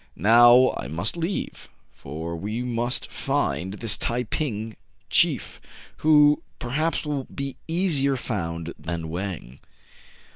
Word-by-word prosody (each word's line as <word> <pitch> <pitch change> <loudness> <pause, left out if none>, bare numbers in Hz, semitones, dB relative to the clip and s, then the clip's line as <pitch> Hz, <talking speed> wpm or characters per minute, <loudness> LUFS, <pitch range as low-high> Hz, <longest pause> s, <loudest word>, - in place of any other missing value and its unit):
" - - -37
Now 120 - +6
I - - -5
must 85 - -2
leave; 170 +3 -4 0.2
for 80 +4 -6
we 105 +7 -4
must 120 0 -1
find 90 +8 -1
this 110 0 -1
Tai 120 +1 0
ping 110 -4 -3 0.4
chief, - - +2 0.4
who 150 -1 +5 0.2
perhaps 155 +7 -1
will 145 -3 -2
be 140 -1 -6
easier 160 -6 +1
found 85 -8 -4
than 80 -1 -4
Wang." 85 -7 -5
115 Hz, 120 wpm, -24 LUFS, 85-140 Hz, 0.4 s, Now